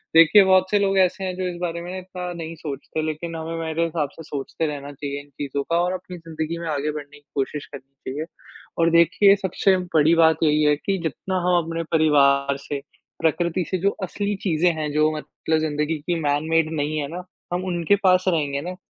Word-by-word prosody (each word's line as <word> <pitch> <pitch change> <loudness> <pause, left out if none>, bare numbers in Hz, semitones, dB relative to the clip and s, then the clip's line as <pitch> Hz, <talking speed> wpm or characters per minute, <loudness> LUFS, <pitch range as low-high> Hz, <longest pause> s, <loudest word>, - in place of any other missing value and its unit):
देखिए 165 +5 +8
बहुत 190 0 +4
से 205 - +4
लोग 195 -1 +1
ऐसे 190 +1 +2
हैं 185 -1 -2
जो 185 -1 -1
इस 175 - -6
बारे 170 -1 -2
में 175 - -7
ना 185 - -5
इतना 180 -1 -6
नहीं 165 -1 -6
सोचते। 150 0 -5
लेकिन 160 +2 -4
हमें 165 +1 -4
मेरे 165 0 -1
हिसाब 155 -4 -2
से 165 - -11
सोचते 145 +3 -4
रहना 145 -1 -5
चाहिए 140 0 -5
इन 145 - -20
चीज़ों 140 -1 -2
का 170 - +3
और 180 +1 0
अपनी 180 -1 -7
ज़िंदगी 165 0 -5
में 170 - -5
आगे 150 0 -1
बढ़ने 145 -1 -8
की 145 - -33
कोशिश 140 +1 -2
करनी 135 -1 -9
चाहिए। 150 +3 -4 0.5
और 165 0 +4
देखिए 185 +4 +5
सबसे 190 0 +1 0.2
बड़ी 155 +2 +5
बात 160 -2 +5
यही 150 0 +3
है 150 0 +4
कि 195 +6 -1
जितना 185 +4 -2
हम 180 -1 +4
अपने 165 +1 -3
परिवार 140 -3 +4
से 140 -1 -3 0.4
प्रकृति 170 +2 +1
से 185 - +1
जो 195 +3 +3
असली 205 +2 -2
चीज़ें 175 -1 +2
हैं 150 -1 -2
जो 155 +1 +3
मतलब 160 +1 -2
ज़िंदगी 150 0 -1
की 175 -2 0
मैन 145 +2 0
मेड 165 -1 +2
नहीं 150 +1 -1
है 140 - -2
ना 180 - -5 0.3
हम 180 +1 -1
उनके 175 +2 +2
पास 185 -1 +4
रहेंगे 145 -5 +1
ना। 180 +3 -5
160 Hz, 215 wpm, -23 LUFS, 150-180 Hz, 0.5 s, देखिए